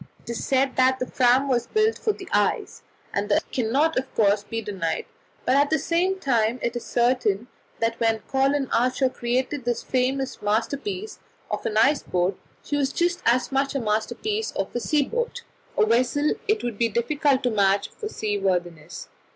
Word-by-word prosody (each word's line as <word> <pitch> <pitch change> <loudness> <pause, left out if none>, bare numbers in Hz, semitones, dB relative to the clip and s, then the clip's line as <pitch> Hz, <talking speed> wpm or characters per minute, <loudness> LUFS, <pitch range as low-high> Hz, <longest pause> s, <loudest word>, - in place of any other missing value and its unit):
It - - -6
is 235 - -4
said 270 0 +1
that 260 0 +4
the 255 - -2
Fram 255 +2 +3
was 245 -3 +1
built 435 +1 +2
for 435 - +1
the - - -10
ice, - - 0 0.3
and - - -1
that - - +1
cannot, 265 +6 +1
of 265 - -7
course, 205 -1 +3
be 225 +2 -4
denied; 190 -7 -3 0.4
but 260 - +3
at 285 +1 +4
the 315 - +3
same 360 +4 0
time 235 -6 +1
it 235 - -1
is 240 - -4
certain 240 -3 +1 0.3
that 230 0 -1
when 225 -1 +2
Colin 270 +1 +1
Archer 255 +2 +2
created 255 +3 -2
his 240 0 -1
famous 260 +1 -1
masterpiece 285 - -2 0.3
of - - -2
an 215 - -1
ice 275 +6 +4
boat, 180 +1 0 0.3
she 290 - -2
was 275 -1 +1
just 350 +3 0
as 245 +3 +2
much 275 +1 0
a - - +1
masterpiece 235 - -1
of 195 - -3
a - - +1
sea 295 +4 +2
boat 475 - -3 0.3
a 440 - +5
vessel 255 - +2
it 430 +1 +1
would 235 -4 -4
be 230 -1 +3
difficult 275 +5 +1
to 245 - +1
match 200 -2 +2
for 425 - -7
seaworthiness. 180 - -2
255 Hz, 185 wpm, -24 LUFS, 225-285 Hz, 0.4 s, a